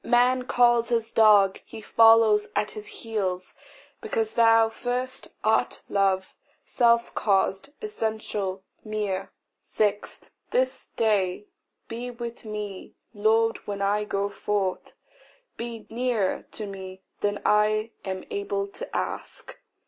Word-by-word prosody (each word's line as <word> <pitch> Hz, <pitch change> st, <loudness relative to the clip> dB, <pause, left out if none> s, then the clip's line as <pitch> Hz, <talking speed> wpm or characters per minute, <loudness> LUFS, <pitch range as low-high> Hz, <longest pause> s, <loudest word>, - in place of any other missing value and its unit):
Man 250 Hz, +1 st, +3 dB
calls 240 Hz, -1 st, +4 dB
his 230 Hz, -1 st, 0 dB
dog, 205 Hz, -3 st, +5 dB
he 225 Hz, -, -10 dB
follows 225 Hz, -1 st, +5 dB
at 210 Hz, -, 0 dB
his 210 Hz, 0 st, -8 dB
heel, 205 Hz, -6 st, -2 dB, 0.6 s
Because 450 Hz, -2 st, -1 dB
thou 225 Hz, -1 st, +5 dB
first 250 Hz, +3 st, -3 dB, 0.2 s
art 220 Hz, +1 st, +1 dB
love, 195 Hz, -1 st, +1 dB, 0.3 s
self 235 Hz, -2 st, +3 dB
caused, 195 Hz, 0 st, +1 dB
essential, 215 Hz, -, -3 dB, 0.2 s
mere. 210 Hz, -3 st, -3 dB, 0.3 s
6. 210 Hz, -1 st, -2 dB, 0.2 s
This -, -, 0 dB
day 205 Hz, -3 st, +1 dB, 0.4 s
be 240 Hz, +2 st, -5 dB
with 235 Hz, -1 st, -7 dB
me, 210 Hz, -3 st, -6 dB, 0.2 s
Lord, 225 Hz, +2 st, +2 dB
when 200 Hz, -1 st, -3 dB
I 205 Hz, +1 st, +1 dB
go 200 Hz, -1 st, -1 dB
forth, 200 Hz, -2 st, -2 dB, 0.6 s
Be 235 Hz, -1 st, -6 dB
nearer 235 Hz, -5 st, -1 dB
to 215 Hz, -, -4 dB
me 190 Hz, -1 st, -8 dB, 0.2 s
than 205 Hz, 0 st, -1 dB
I 215 Hz, +1 st, +3 dB
am 190 Hz, -1 st, -4 dB
able 405 Hz, -1 st, -2 dB
to 400 Hz, +6 st, -8 dB
ask. -, -, -5 dB
215 Hz, 120 wpm, -26 LUFS, 200-235 Hz, 0.6 s, dog